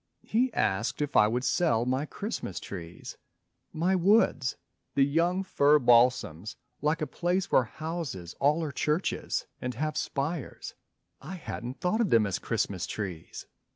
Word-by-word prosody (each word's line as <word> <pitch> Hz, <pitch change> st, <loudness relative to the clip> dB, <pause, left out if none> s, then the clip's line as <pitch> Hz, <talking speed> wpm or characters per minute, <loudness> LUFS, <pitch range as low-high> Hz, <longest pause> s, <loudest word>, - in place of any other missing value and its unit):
He 250 Hz, +3 st, +1 dB
asked 95 Hz, +4 st, 0 dB
if 145 Hz, -1 st, -2 dB
I 105 Hz, -, +6 dB
would 120 Hz, +3 st, -1 dB
sell 130 Hz, -4 st, +2 dB
my 130 Hz, +4 st, 0 dB
Christmas 200 Hz, -, -5 dB
trees; 85 Hz, -3 st, -8 dB, 0.5 s
My 175 Hz, +4 st, +1 dB
woods 185 Hz, -, +3 dB, 0.4 s
the 135 Hz, -, +5 dB
young 170 Hz, +6 st, +1 dB
fir 150 Hz, -5 st, +4 dB
balsams 120 Hz, -, +3 dB, 0.3 s
like 150 Hz, +2 st, +1 dB
a -, -, +1 dB
place 175 Hz, +6 st, -1 dB
Where 130 Hz, -, +5 dB
houses 155 Hz, -, -5 dB
all 150 Hz, +4 st, +3 dB
are 150 Hz, -, -3 dB
churches 150 Hz, +6 st, -1 dB, 0.2 s
and 125 Hz, -1 st, -3 dB
have 155 Hz, +4 st, -2 dB
spires. 145 Hz, +1 st, -3 dB, 0.5 s
I 190 Hz, -, -7 dB
hadn't 130 Hz, -6 st, -6 dB
thought 215 Hz, +6 st, +1 dB
of 215 Hz, -, +1 dB
them 115 Hz, -2 st, +5 dB
as 100 Hz, -3 st, -2 dB
Christmas 95 Hz, -2 st, -2 dB
Trees. 95 Hz, -7 st, -6 dB
140 Hz, 150 wpm, -28 LUFS, 115-170 Hz, 0.5 s, I